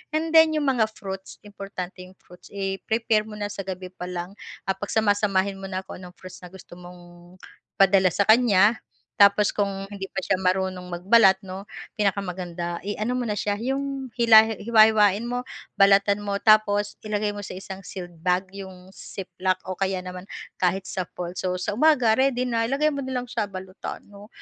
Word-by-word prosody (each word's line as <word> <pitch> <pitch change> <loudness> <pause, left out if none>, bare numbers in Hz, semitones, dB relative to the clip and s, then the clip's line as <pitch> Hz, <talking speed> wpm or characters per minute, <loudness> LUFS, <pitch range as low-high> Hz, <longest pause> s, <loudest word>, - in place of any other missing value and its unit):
And 320 +1 0
then 320 -1 +6
yung 290 -3 +1
mga 230 -4 +2
fruits 190 -1 -8
importante 195 -2 -8
yung 185 - -16
fruits, 180 0 -17
i-prepare 215 +3 -1
mo 215 - -9
na 205 -1 -4
sa 195 -1 -6
gabi 185 -1 -6
pa 180 - -8
lang 180 +2 -6 0.3
at 190 - 0
pagsama-samahin 205 -2 +1
mo 195 - -7
na 185 0 -4
kung - - -10
anong 180 -1 -11
fruits 185 0 -12
na 180 - -11
gusto 175 -1 -13
mong 175 0 -14 0.4
padala 190 -2 +5
sa 200 - +1
kanya. 220 -2 +5 0.4
Tapos 200 +1 +5
kung 195 -1 -1
hindi 200 -1 -7
pa 190 - -3
siya 195 - +1
marunong 185 -1 -1
magbalat 195 -1 +5
'no 190 +2 -7 0.4
pinakamaganda 180 -4 -2
iano 215 +4 -2
mo - - -1
na 210 - -1
siya 205 -1 -1
'yong 270 +1 -3
hila 220 -1 +7 0.2
hiwa-hiwain 215 -2 +5
mo, 245 +1 -3 0.4
balatan 200 +1 +5
mo, 200 -1 -2
tapos 205 -1 +3
ilagay 210 0 -1
mo - - -6
sa - - -7
isang 190 0 -8
sealed 175 -2 -8
bag 185 +1 +1
yung 190 -1 -10
ziplock 185 0 -3
o 185 - -3
kaya 190 -1 0
naman 180 0 -8 0.4
kahit 185 +1 +1
sa 185 - -3
polso. 180 +1 -4
Sa 185 - -2
umaga 255 -6 +4
ready 260 -2 +2
na 230 -1 0
ilagay 300 +4 +1
mo - - -3
na 260 0 -5
lang 245 - -7
siya 225 - -1
balutan 190 0 -8
'no 205 0 -14
195 Hz, 180 wpm, -24 LUFS, 185-220 Hz, 0.4 s, hila